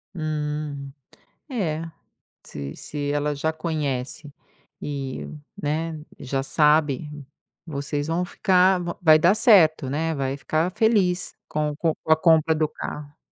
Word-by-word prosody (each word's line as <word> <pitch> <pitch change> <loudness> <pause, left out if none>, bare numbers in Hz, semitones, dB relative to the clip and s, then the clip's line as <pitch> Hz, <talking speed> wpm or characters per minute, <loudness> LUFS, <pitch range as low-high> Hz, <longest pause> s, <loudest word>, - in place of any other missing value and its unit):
Hum. 150 -3 -4 0.6
É, 165 - -2 0.6
se 70 -1 -7
se 145 -1 -4
ela 145 0 0
já 160 +3 -1
conhece 150 -3 -3 0.5
e, 135 -3 -5 0.4
né, 155 +2 -2 0.2
já 135 +1 -2
sabe, 150 0 +2 0.6
vocês 145 -1 -3
vão 170 +2 0
ficar 185 -1 +3
va 170 0 -4
vai 155 -2 +7
dar 175 +5 +4
certo, 160 - +5
né, 160 +3 -1
vai 135 -1 -2
ficar 155 +5 0
feliz 195 -6 +2
com 150 0 -1
o - - -9
com 160 0 0
com 160 - +1
a - - +7
compra 160 -1 +4
do 155 0 +1
carro. 150 0 -8
155 Hz, 135 wpm, -24 LUFS, 145-165 Hz, 0.6 s, vai